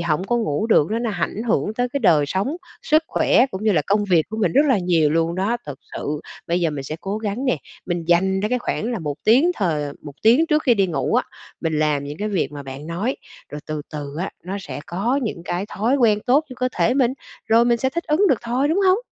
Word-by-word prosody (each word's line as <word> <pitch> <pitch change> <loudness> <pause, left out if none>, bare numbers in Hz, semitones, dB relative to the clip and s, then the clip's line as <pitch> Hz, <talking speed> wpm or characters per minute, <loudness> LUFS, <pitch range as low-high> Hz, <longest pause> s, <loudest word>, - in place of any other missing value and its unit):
hổng 170 +1 0
có 240 +3 0
ngủ 215 -2 -1
được 195 -5 +3
nó 225 - 0
nó 235 -2 -1
ảnh 200 +3 -2
hưởng 215 0 +1
tới 245 +1 0
cái 280 +3 -3
đời 160 - +4
sống, 200 - -1 0.3
sức 310 +1 +3
khỏe 250 - +3
cũng 190 +3 -5
như 215 - +4
là 155 -4 +2
công 205 +1 +2
việc 175 -5 +3
của 220 - -4
mình 185 -7 +1
rất 295 +2 +4
là 260 -7 +3
nhiều 170 -4 +2
luôn 165 +1 +1
đó. 200 +6 0
Thật 145 - -5 0.2
sự 150 +1 -3 0.3
bây 175 +1 0
giờ 165 -2 +1
mình 140 -2 -5
sẽ 155 +3 -5
cố 200 +2 -3
gắng 220 +4 -3
nè, 255 - +2 0.3
mình 175 -2 -2
dành 190 +2 +3
ra 210 - 0
cái 250 0 +1
khoảng 240 0 -2
là 225 - -2
1 150 -3 -3
tiếng 260 +11 +5
thời 165 -7 0
ờ, 145 - -5
1 145 -2 -8
tiếng 245 +9 +5
trước 305 0 +2
khi 245 -4 +4
đi 195 -2 +2
ngủ 155 -6 -1
á, - - +3 0.4
mình 160 -2 -1
làm 150 -2 +1
những 145 +2 -7
cái 210 +1 -2
việc 190 -6 -1
mà 145 -1 -7
bạn 135 +3 -8
nói, 195 +10 -2 0.3
rồi 150 - -6
từ 155 -1 -4
từ 145 -1 -6
á, 185 - -2
nó 190 +2 -4
sẽ 140 -5 -7
có 230 +10 0
những 190 -7 -4
cái 180 +4 -2
thói 230 +7 0
quen 215 -5 +3
tốt 275 +5 +4
cho 255 - -9
cơ 255 - +2
thể 245 - +2
mình, 255 -2 +2 0.3
rồi 230 +1 +5
mình 235 -1 +2
sẽ 265 +2 0
thích 340 +4 -3
ứng 350 +6 +3
được 255 - +3
thôi, 250 +5 0
đúng 340 +5 +1
hông? 370 +3 +5
200 Hz, 265 wpm, -21 LUFS, 160-240 Hz, 0.4 s, tiếng